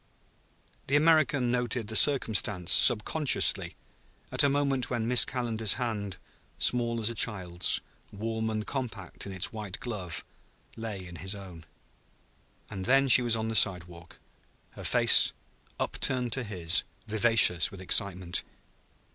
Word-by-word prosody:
The 140 - 0
American 145 -5 +2
noted 120 -1 -3
the 110 - -7
circumstance 105 - +2
subconsciously, 135 +6 +3 0.6
at - - +3
a 140 - +3
moment 135 -3 -1
when 120 -2 -3
Miss 125 0 +5
Calendar's 115 -4 -2
hand, 105 -6 -5 0.4
small 120 -1 0
as 115 +1 -1
a - - -7
child's, 95 -6 0 0.3
warm 110 +2 -5
and 110 -1 -4
compact 110 -10 -6
in - - -8
its 95 +2 -3
white 105 -4 -7
glove, 95 -9 -7 0.5
lay 105 -5 -7
in 85 -1 -11
his 95 +3 -5
own. 90 -5 -12 1.0
And 95 -1 -8
then 135 +2 +2
she 125 - +8
was 120 -2 +1
on 110 0 -4
the 110 - -4
sidewalk, 90 -4 0 0.5
her - - -12
face, - - +4 0.5
upturned 125 -3 -1
to 130 - -2
his, 90 -7 0 0.2
vivacious 110 -6 +4
with 100 - -13
excitement. 95 -1 0
110 Hz, 135 wpm, -27 LUFS, 95-125 Hz, 1.0 s, she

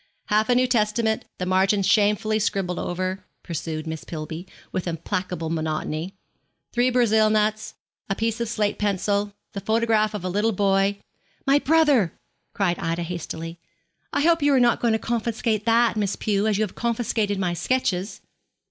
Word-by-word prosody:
'Half 215 +2 +2
a 245 - +4
New 255 +1 +4
Testament 220 -2 +1
the 180 - -3
margins 190 +2 +2
shamefully 215 +1 +3
scribbled 195 -4 -1
over,' 185 +2 -3 0.2
pursued 160 -1 -4
Miss 160 -1 -5
Pillby, 160 +2 -6 0.2
with 185 -1 -3
implacable 170 0 -3
monotony. 160 +2 -3 0.6
'Three 245 +1 +3
Brazil 220 -3 +3
nuts. 215 0 0 0.3
A 195 - 0
piece 225 +2 -1
of 235 - -1
slate 215 -3 -1
pencil. 205 0 0 0.2
The 200 - -4
photograph 220 0 +2
of 200 - -5
a - - 0
little 210 +5 +1
boy 195 0 +2 0.3
' 200 0 -38
'My 275 +1 +5
brother,' 290 - +3 0.4
cried 180 -4 +1
Ida 165 +1 -2
hastily. 165 -1 -6 0.5
'I - - 0
hope 330 +1 +3
you 290 0 +4
are - - +5
not 240 -1 +3
going 235 -2 +2
to - - +3
confiscate 225 -1 -1
that, 230 0 +4
Miss 205 -2 0
Pew, 205 0 0
as 210 -2 +2
you 215 - +2
have 210 - -4
confiscated 225 -3 -1
my 180 -2 0
sketches.' 190 0 -1
205 Hz, 165 wpm, -24 LUFS, 180-225 Hz, 0.6 s, My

